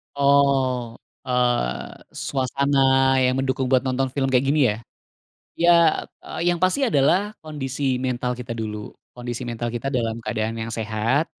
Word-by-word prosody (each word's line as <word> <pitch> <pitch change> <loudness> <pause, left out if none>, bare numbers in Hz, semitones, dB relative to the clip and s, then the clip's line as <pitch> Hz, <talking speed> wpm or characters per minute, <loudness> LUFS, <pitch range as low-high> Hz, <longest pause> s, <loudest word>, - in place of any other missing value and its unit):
Oh, 135 -4 +2 0.3
eee, 120 - 0 0.2
suasana 140 +1 -1 0.5
yang 130 0 +2
mendukung 130 -1 -1
buat 130 0 +3
nonton 130 0 0
film 135 -2 0
kayak 130 +1 +3
gini 150 +2 +2
ya? 105 - -3 0.8
Iya, 170 +1 +5 0.5
eee, - - -7
yang 175 - -2
pasti 185 +10 +2
adalah 195 - +2
kondisi 135 -3 -2
mental 125 -1 -2
kita 120 -1 -7
dulu. 105 -2 -6 0.2
Kondisi 120 0 -5
mental 120 0 -3
kita 120 +3 -3
dalam 115 -4 -2
keadaan 110 +1 -2
yang 115 +1 -4
sehat. 115 +7 0
130 Hz, 140 wpm, -23 LUFS, 115-140 Hz, 0.8 s, Iya